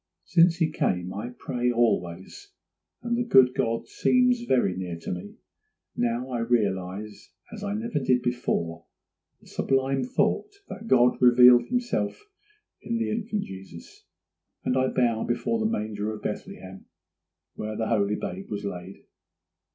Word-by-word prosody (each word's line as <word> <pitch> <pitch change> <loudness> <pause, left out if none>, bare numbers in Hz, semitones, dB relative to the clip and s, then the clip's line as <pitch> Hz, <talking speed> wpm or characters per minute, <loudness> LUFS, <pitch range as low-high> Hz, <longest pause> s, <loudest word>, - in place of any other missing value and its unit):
Since 170 0 +4
he 165 -3 +1
came 90 - -1
I 105 +5 -5
pray 125 0 -1
always, 115 - -1 0.5
and 235 0 0
the 240 - 0
good 130 - +5
God 115 -1 -1
seems 250 -1 +2
very 100 -8 +2
near 90 -2 -5
to 80 - -6
me. 90 -1 -6 0.6
Now 120 +2 -1
I 120 - -2
realize 105 -3 -2 0.2
as 210 -2 -8
I 200 0 -2
never 225 -5 -2
did 125 -2 +1
before 85 -9 -2 0.6
the - - -21
sublime 135 0 0
thought 400 - 0
that 225 - -8
God 125 - +4
revealed 125 0 +7
himself 245 +11 -2 0.6
in 235 - -2
the 230 - -1
infant 215 -1 -2
Jesus; 95 -3 -12 0.6
and 125 - +1
I 130 0 +2
bow 120 -4 +1
before 125 - -1
the 220 - +1
manger 105 0 -2
of 110 - -8
Bethlehem 95 0 -7 0.7
where 110 0 -5
the 110 - -2
Holy 105 -2 +1
Babe 95 -1 -6
was 105 -1 -4
laid. 95 -1 -7
120 Hz, 145 wpm, -26 LUFS, 100-165 Hz, 0.7 s, revealed